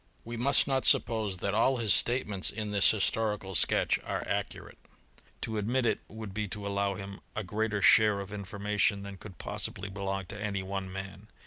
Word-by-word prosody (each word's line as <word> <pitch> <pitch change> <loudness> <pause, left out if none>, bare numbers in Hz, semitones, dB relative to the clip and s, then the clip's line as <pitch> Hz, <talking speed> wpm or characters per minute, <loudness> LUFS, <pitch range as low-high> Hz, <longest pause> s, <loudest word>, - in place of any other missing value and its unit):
We 120 +1 -6
must 135 +4 +4
not 135 -1 0
suppose 110 -5 +3
that 100 +2 -2
all 130 +5 +3
his 110 -5 +4
statements 105 -6 +2
in 105 -1 -5
this 100 -1 +6
historical 105 -2 +1
sketch 85 - +2
are - - -4
accurate: - - -4 0.6
to 110 -1 -2
admit 120 +5 0
it - - +1
would 110 -2 -8
be 105 +1 -2
to 100 +1 -6
allow 100 0 -1
him 100 +1 -8 0.2
a 110 - -2
greater 105 +2 -2
share 105 -2 +6
of 100 +1 -7
information 100 0 -1
than 100 -1 -8
could 95 -2 -12
possibly 100 +1 -4
belong 95 -1 -4
to 105 - -7
any 100 -2 -2
one 95 0 -4
man. 95 +2 -8
105 Hz, 185 wpm, -30 LUFS, 100-110 Hz, 0.6 s, this